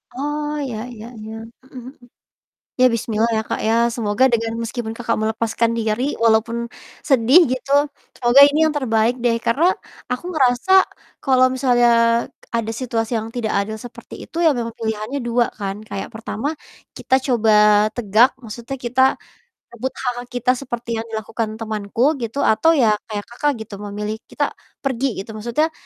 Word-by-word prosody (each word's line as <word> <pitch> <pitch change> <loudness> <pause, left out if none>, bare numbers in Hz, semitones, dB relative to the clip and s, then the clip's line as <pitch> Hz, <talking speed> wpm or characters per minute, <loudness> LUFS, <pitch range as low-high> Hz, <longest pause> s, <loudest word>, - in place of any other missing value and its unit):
Oh, 295 +2 -3
iya 250 -5 -4 0.2
iya 220 -1 -10
iya, 215 +1 -8 0.3
mhm 260 0 -11
mhm. - - -23 0.9
Iya, 255 - +6
bismillah 225 0 0
ya, 220 - +1
Kak, - - -2
ya, 225 - +3 0.2
semoga 225 0 +1
dengan 225 -1 0
meskipun 230 -1 -4
Kakak 235 -1 -1
melepaskan 225 +1 0
diri, 220 +2 0 0.2
walaupun 225 +1 +3 0.5
sedih 265 +4 +6
gitu, 260 +1 -5 0.5
semoga 240 +3 +5
ini 290 +1 -1
yang 315 - +3
terbaik 230 -3 +1
deh, 235 -1 +3
karena 265 +9 +3 0.5
aku 250 +6 -4
ngerasa 255 0 +1 0.5
kalau 255 -2 +4
misalnya 245 -2 +3 0.7
ada 230 -1 -1
situasi 230 -2 -2
yang 220 +1 -5
tidak 235 -3 -2
adil 210 +2 -2
seperti 245 - -11
itu - - -15
ya, 310 - +5
memang 230 -1 -3
pilihannya 220 +4 -3
2 235 0 +2
kan, 195 -2 -3
kayak 195 - -4
pertama 220 +3 -4 0.5
kita - - 0
coba 230 -4 +2 0.5
tegak, 230 +2 +4
maksudnya 235 +2 -7
kita 250 +1 0 0.7
rebut 240 +2 -3 0.2
hak-hak 245 -1 -3
kita, 250 0 0
seperti 240 -2 -6
yang 225 - -7
dilakukan 220 0 -4
temanku 220 +4 0
gitu, 230 +3 -4
atau 320 +10 +4
ya 230 -6 +4 0.2
kayak 205 -2 -4
Kakak 290 +5 -1
gitu, 215 - -11
memilih 210 +1 -5
kita - - -1 0.4
pergi 265 -2 -1
gitu, 195 +3 -6
maksudnya 235 +9 -1
235 Hz, 155 wpm, -20 LUFS, 220-255 Hz, 0.9 s, Iya